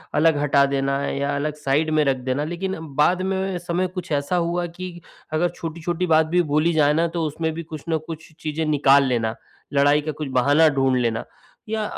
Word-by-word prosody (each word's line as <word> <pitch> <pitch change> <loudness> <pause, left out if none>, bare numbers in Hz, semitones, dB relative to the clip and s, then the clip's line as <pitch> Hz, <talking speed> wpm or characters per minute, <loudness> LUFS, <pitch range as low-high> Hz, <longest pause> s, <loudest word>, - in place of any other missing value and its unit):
अलग 160 -1 +4
हटा 140 -1 +4
देना 140 0 0
या 140 +1 -1
अलग 150 +2 -2
साइड 150 +1 0
में 155 -1 +3
रख 135 -1 +2
देना। 130 +3 -2
लेकिन 175 +4 -3 0.2
बाद 175 +5 +3
में 190 0 -1
समय 175 +1 -1
कुछ 180 -1 -5
ऐसा 145 +4 0
हुआ 175 0 0
कि 180 -1 -7 0.3
अगर 170 +3 +2
छोटी-छोटी 170 +2 -3
बात 160 -1 +4
भी 175 +3 +2
बोली 155 +3 +3
जाए 150 -2 +3
ना 165 +2 +2
तो 165 - 0
उसमें 160 +2 -2
भी 165 +1 -5
कुछ 155 -2 -9
न 160 - +2
कुछ 160 0 -8
चीज़ें 155 +1 -3
निकाल 140 -2 +4
लेना, 115 -4 0 0.4
लड़ाई 145 +1 +4
का 155 +1 -3
कुछ 150 -1 -5
बहाना 145 +5 +4
ढूँढ 135 -3 +1
लेना। 115 -1 -1 0.4
या 220 0 -1
155 Hz, 200 wpm, -22 LUFS, 140-170 Hz, 0.4 s, अलग